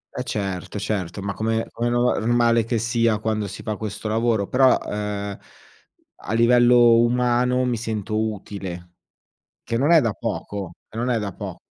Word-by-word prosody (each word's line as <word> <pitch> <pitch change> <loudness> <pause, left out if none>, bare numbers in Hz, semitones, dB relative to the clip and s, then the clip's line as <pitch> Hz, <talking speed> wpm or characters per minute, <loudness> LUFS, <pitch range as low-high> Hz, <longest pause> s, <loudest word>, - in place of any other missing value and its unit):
E 125 - -2
certo, 100 -3 -4
certo, 100 -2 -3
ma 100 0 -2
come 110 +1 -1
come 120 +1 -2
nova 120 +1 +2
normale 115 0 +2
che 115 0 -1
sia 115 -1 +1
quando 110 -1 -2
si 100 - -9
fa 105 -2 -3
questo 110 0 -5
lavoro. 110 -2 +1
Però, 130 0 +4
ehm, 105 -1 -4 0.9
a - - -3
livello 120 0 +5
umano 125 +1 +2
mi 120 -2 0
sento 110 -1 -3 0.2
utile. 90 -4 -8 0.7
Che 115 - -3
non 140 +7 +2
è 165 -3 +7
da 115 -3 0
poco, 95 -4 -5
che 110 - -11
non 125 +1 -1
è 120 - +2
da 100 -3 -4
po - - -7
115 Hz, 170 wpm, -23 LUFS, 105-120 Hz, 0.9 s, è